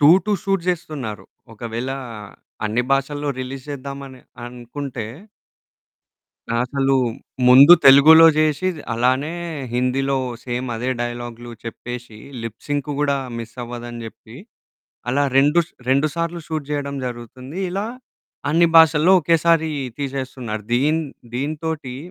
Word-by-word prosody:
To 145 - +7 0.2
to 210 - 0
shoot 195 -3 0
జేస్తున్నారు. 150 -11 -3 0.3
ఒకవేళా 120 +4 -4 0.7
అన్ని 110 +4 0
భాషల్లో 145 +2 -1
రిలీజ్ 130 +1 -7
జేద్దామని 140 -1 -7 0.2
అనుకుంటే 120 0 -6 1.5
అసలూ 135 +2 +1 0.5
ముందు 140 +6 +9
తెలుగులో 150 +4 +9
జేషి 155 +3 +2 0.3
అలానే 130 +7 +1 0.4
హిందీలో 135 +2 0 0.3
సేమ్ 125 0 -3
అదే 125 +3 -2
డైలాగ్లు 120 0 -5
చెప్పేషీ, 120 -1 -8 0.2
లిప్ 115 -1 -7
సింకు 145 0 -2
గూడా 140 -1 +1 0.2
మిస్సవ్వదని 120 0 -7
జెప్పి, 110 +1 -12 0.7
అలా 135 +4 +2
రెండు 145 +5 +5
స్ - - -24 0.2
2 140 +3 +3
సార్లు 170 0 -2
షూట్ 155 -3 -4
జెయడం 140 -1 -3
జరుగుతుంది. 125 - -8
ఇలా 195 +3 -2 0.6
అన్ని 170 +2 +4
భాషల్లో 160 +2 +6
ఒకేసారీ 165 0 +2 0.3
తీసేస్తున్నారు. 130 -5 -4
దీన్ 150 +6 +2 0.3
దీనితోటీ 150 -1 -3
135 Hz, 110 wpm, -21 LUFS, 120-150 Hz, 1.5 s, ముందు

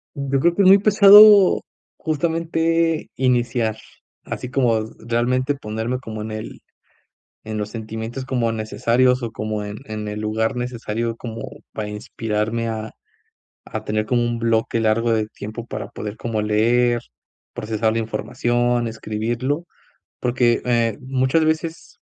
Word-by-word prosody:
Yo 140 -1 -1
creo 170 +4 +3
que 200 - +3
es 185 - +6
muy 195 +1 +8
pesado, 205 -1 +8 0.4
justamente, 165 +1 0
iniciar, 120 -3 +1 0.5
así 125 - -6
como 120 -5 +2 0.2
realmente 125 +4 0
ponerme 115 +1 -3
como 110 -3 -7
en 110 +1 -5
el 110 0 -7 0.8
en 110 0 -5
los 105 -1 -3
sentimientos 110 +3 -6
como 120 -3 0
necesarios 120 +3 +1
o 115 - -3
como 110 -1 -3
en 105 0 -6
en 105 -1 -5
el 105 0 -5
lugar 110 +3 -1
necesario 115 -2 -3
como 115 -1 -7 0.3
para 105 -1 -4
inspirarme 110 +2 -3
a 110 -1 -4 0.8
a - - -5
tener 110 0 -1
como 120 -1 +1
un 120 0 -1
bloque 115 0 +1
largo 115 +1 +2
de 110 -1 +1
tiempo 110 +2 -8
para - - -6
poder 105 +1 -6
como 115 -2 -2
leer, 120 +3 +2 0.5
procesar 110 0 -1
la 115 - 0
información, 120 +2 0
escribirlo. 115 +7 -3 0.6
Porque, 120 -1 +2
eh, 115 -2 +1
muchas 130 +4 +1
veces, 160 +1 -3
115 Hz, 140 wpm, -21 LUFS, 110-130 Hz, 0.8 s, muy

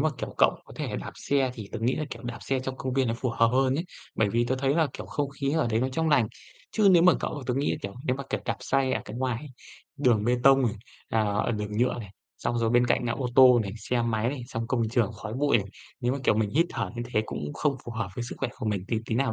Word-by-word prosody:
mà, 155 - +3
kiểu, - - -5
cậu - - +6
có - - -14
thể - - -3
đạp - - -5
xe 135 -2 +1
thì 110 -5 -8
tớ 115 - -3
nghĩ 120 +3 +1
là, 155 - -1
kiểu, - - -7
đạp 120 0 -5
xe 135 -1 -1
trong 130 0 -5
công 130 -1 -3
viên 130 -2 +2
nó 115 - 0
phù 125 +1 -1
hợp 115 0 +3
hơn 130 +2 +2
ấy. 160 +5 -1 0.3
Bởi 110 -2 +2
vì 120 +3 +1
tớ 130 - +1
thấy 135 +1 +1
là, 160 -1 +3
kiểu, - - -7
không 145 -1 -2
khí 140 0 -2
ở 160 -4 +2
đấy 110 0 +2
nó 130 - +1
trong 160 +5 0
lành. 130 -8 +4 0.4
Chứ 210 -2 +4
nếu 175 -2 +6
mà 180 0 +7
cậu 145 -3 -3
tớ 125 - 0
nghĩ 140 +2 +1
là, - - -2
kiểu, 100 0 -5
nếu 130 - 0
mà, 140 - -5
kiểu, - - -1
đạp - - -1
xe 135 -1 +1
ở - - 0
cái 105 - -7
ngoài 125 +2 -2 0.5
đường 120 -6 +3
bê 120 +2 +3
tông 135 0 +6
này, 115 -4 +1 0.3
à, 115 - +1
ở 105 +2 0
đường 105 -1 -3
nhựa 120 +4 +2
này, 105 -5 -8 0.3
xong 120 - -1
rồi 115 -1 +1
bên 120 +1 +4
cạnh 125 - +2
là 120 - 0
ô 125 +1 -2
tô 130 -2 +8
này, 100 -2 -5
xe 120 +3 -1
máy 115 -1 0
này, 130 -2 -4
xong 115 0 -3
công 115 -2 0
trường 115 -1 +1
khói 110 +1 -7
bụi 140 0 +3
này, 100 - -4 0.3
nếu 120 +1 +1
mà, 140 - -2
kiểu, - - +4
mình 110 -1 +1
hít 165 +8 +3
thở 120 - -3
như 120 - -2
thế 110 - +3
cũng 75 0 -5
không 145 -3 0
phù 120 - -6
hợp 110 -3 -3
với 120 - -3
sức - - -6
khỏe - - -1
của 125 - -4
mình 100 -3 -1
tí 115 - 0
tí 110 - -1
nào 130 0 +1
125 Hz, 300 wpm, -27 LUFS, 115-135 Hz, 0.5 s, tô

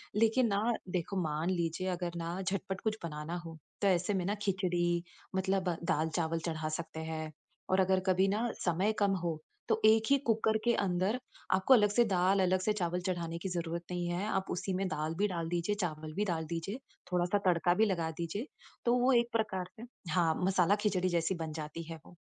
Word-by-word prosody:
लेकिन 225 +3 +4
ना 200 0 +1 0.3
देखो, 180 +2 -2
मान 155 +2 -1
लीजिए 175 0 -1
अगर 175 -1 -3
ना 170 +2 -3
झटपट 190 0 -2
कुछ 220 -1 -1
बनाना 155 +1 -4
हो 165 -1 -8 0.2
तो 200 - +3
ऐसे 180 +2 +2
में 185 -2 0
ना, 205 +3 0
खिचड़ी 175 -3 +1 0.3
मतलब 190 -1 +1
दाल-चावल 160 +1 0
चढ़ा 160 -2 -2
सकते 160 0 -5
हैं। 155 0 -4 0.4
और 185 - +3
अगर 190 0 +4
कभी 190 +1 +4
ना 215 +5 0 0.2
समय 185 +5 +2
कम 200 -1 +3
हो, 165 -3 -1 0.3
तो - - +2
एक 220 0 +6
ही 280 - +7
कुकर 220 -1 +3
के 235 - +3
अंदर 195 +5 +1 0.3
आपको 190 +8 +5
अलग 210 -4 +6
से 240 +4 +4
दाल, 190 -1 +3
अलग 185 0 +3
से 215 - +1
चावल 180 -3 -1
चढ़ाने 170 -2 -2
की 190 - -4
ज़रूरत 170 -1 -3
नहीं 175 -1 -1
है। 175 +3 -1
आप 190 -3 0
उसी 190 +2 -2
में 190 +1 0
दाल 155 -2 -2
भी 210 - +3
डाल 170 -4 -3
दीजिए, 175 +4 0
चावल 155 -3 -3
भी 205 +5 0
डाल 165 -4 -1
दीजिए, 170 +8 -4 0.3
थोड़ा-सा 180 +2 +2
तड़का 175 -1 +4
भी 215 +5 +4
लगा 170 -6 0
दीजिए। 185 - -3 0.4
तो 240 - +4
वो 255 +2 +4
एक 235 -1 +3
प्रकार 200 -5 -1
से - - -7 0.3
हाँ, 170 -3 +3
मसाला 190 0 +4
खिचड़ी 185 -3 +1
जैसी 170 +1 +1
बन 160 -2 -4
जाती 155 +1 -5
है 165 - -5
वो। - - -15
180 Hz, 200 wpm, -32 LUFS, 170-200 Hz, 0.4 s, ही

